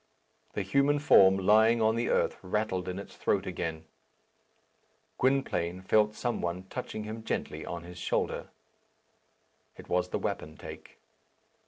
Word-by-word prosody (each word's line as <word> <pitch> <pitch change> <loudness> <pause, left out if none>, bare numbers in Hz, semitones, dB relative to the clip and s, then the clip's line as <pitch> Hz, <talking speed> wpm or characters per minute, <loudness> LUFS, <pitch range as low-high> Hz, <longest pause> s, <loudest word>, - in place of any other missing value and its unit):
The 100 - -2
human 140 +9 +2
form 95 -9 +6
lying 110 +4 +5
on 110 0 +3
the 115 +1 -1
earth - - +2
rattled 95 -1 -2
in 90 - -4
its 100 - -9
throat - - 0
again. 80 -1 -4 1.3
Gwynplaine 95 -9 0
felt 105 +2 +3
some 120 +1 -2
one 85 +2 -3
touching 110 - -5
him 110 +1 -6
gently - - -3
on 85 0 -5
his 90 +1 -10
shoulder. - - -1 1.3
It - - -12
was 90 0 +1
the - - -1
wapentake. 80 +1 -6
100 Hz, 135 wpm, -30 LUFS, 90-110 Hz, 1.3 s, form